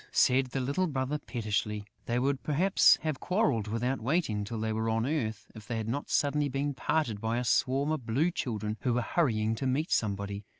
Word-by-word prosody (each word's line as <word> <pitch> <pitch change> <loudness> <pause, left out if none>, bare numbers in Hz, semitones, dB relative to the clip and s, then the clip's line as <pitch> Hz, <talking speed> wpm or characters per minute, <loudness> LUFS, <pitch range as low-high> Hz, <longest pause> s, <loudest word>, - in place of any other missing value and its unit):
said 130 +1 +4
the 130 +2 -3
little 140 +9 0
brother, 140 0 -2
pettishly. 105 -4 -2 0.2
They 120 - 0
would 135 +2 0
perhaps 175 +6 +4
have 155 -4 -2
quarrelled, 180 - +1
without 120 +4 -1
waiting 120 -6 0
till 110 +2 -5
they 110 0 -1
were 110 +1 -1
on 115 +1 +1
earth, 125 -7 -2
if 110 -2 -12
they 115 - -2
had 110 -1 -3
not 140 +5 -3
suddenly 145 0 +1
been 140 +2 -1
parted 130 -7 -1
by 115 +1 0
a 125 - 0
swarm 135 +5 +2
of 140 -7 -3
Blue 145 +10 +2
Children 110 -8 -3
who 120 +1 0
were 125 - +2
hurrying 110 -10 +1
to 120 +4 -2
meet 145 +6 0
somebody. 100 -1 -1
125 Hz, 205 wpm, -30 LUFS, 110-145 Hz, 0.2 s, said